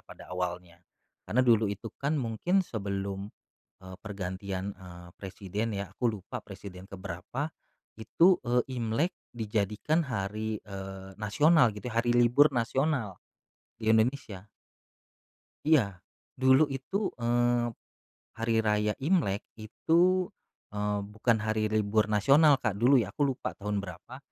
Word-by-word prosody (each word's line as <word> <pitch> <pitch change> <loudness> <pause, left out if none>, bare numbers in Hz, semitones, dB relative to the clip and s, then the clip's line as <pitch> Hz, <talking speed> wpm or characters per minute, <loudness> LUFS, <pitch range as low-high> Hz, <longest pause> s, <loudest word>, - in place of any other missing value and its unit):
pada - - -13
awalnya. 90 -1 -4 0.5
Karena 125 +3 +3
dulu 115 -3 +4
itu 100 +2 -6
kan 145 +3 0
mungkin 150 - +1
sebelum, 100 -3 -4 0.6
eee, 95 0 -9
pergantian, 95 -1 -4
eee, 90 -2 -12
presiden 100 +3 -4
ya 100 -1 -5
aku 125 - 0
lupa 105 +5 -7
presiden 95 -2 -10
ke 100 - -8
berapa, 100 - -5 0.5
itu, 175 - +4
eee, 120 0 +1 0.2
Imlek 115 +10 0 0.2
dijadikan 110 - 0
hari, 110 -5 -3
eee, 95 -1 -8
nasional 125 +2 +4
gitu 120 +2 -6
ya 115 - +2
hari 120 0 +1
libur 120 +5 +6
nasional 120 - 0 0.6
di 110 -1 +1
Indonesia. 110 -4 0 1.2
Iya, 115 -12 +3 0.4
dulu 130 +3 +5
itu, 145 +10 -3
eee, 120 0 +2 0.7
Hari 115 0 0
Raya 105 0 +2
Imlek 150 - +1 0.2
itu, 175 - +2 0.5
eee, 105 0 -1
bukan 110 +3 +1
hari 110 0 0
libur 105 0 +1
nasional 140 +8 +5
Kak 110 -6 -1
dulu 130 +4 +6
ya 115 - -1
aku 150 - -1
lupa 125 - -5
tahun 105 0 -3
berapa 90 +8 -9
110 Hz, 130 wpm, -29 LUFS, 100-130 Hz, 1.2 s, libur